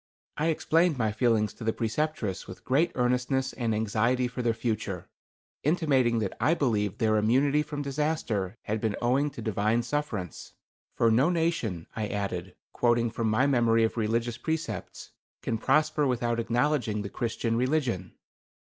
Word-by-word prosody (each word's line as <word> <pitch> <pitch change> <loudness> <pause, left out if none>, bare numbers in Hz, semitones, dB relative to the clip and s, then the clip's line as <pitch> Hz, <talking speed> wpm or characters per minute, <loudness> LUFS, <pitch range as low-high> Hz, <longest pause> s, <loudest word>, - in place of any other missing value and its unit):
I 155 - 0
explained 165 0 +2
my 110 -3 +1
feelings 110 -2 +1
to - - -10
the 110 0 +1
Preceptress 115 -5 -2
with 95 - -11
great 155 +6 +2
earnestness 125 +1 0
and 120 -3 -1
anxiety 115 +4 +1
for 125 +1 -5
their 120 -1 +2
future, 110 -6 -3 0.5
intimating 140 -7 +2
that 105 -4 -2
I 165 - +4
believed 105 - 0
their 110 -3 +2
immunity 135 +7 +3
from 145 -1 -4
disaster 135 - -1
had 110 +1 -2
been 110 -3 0
owing 130 +5 +2
to 140 - -9
Divine 110 +2 +1
sufferance. 115 - -4 0.4
"For 115 - +3
no 130 +9 +4
nation," 165 - -1
I 110 -1 -2
added, 95 -3 -4 0.2
quoting 120 -1 +2
from 115 0 -1
my 110 +5 +3
memory 115 -4 +3
of 110 - 0
religious 115 +1 -1
precepts, 160 - -4 0.3
"can 115 - -1
prosper 150 +3 +2
without 120 -2 0
acknowledging 120 -3 0
the 100 - -5
Christian 115 0 -2
religion." 125 - 0
120 Hz, 155 wpm, -28 LUFS, 110-140 Hz, 0.5 s, I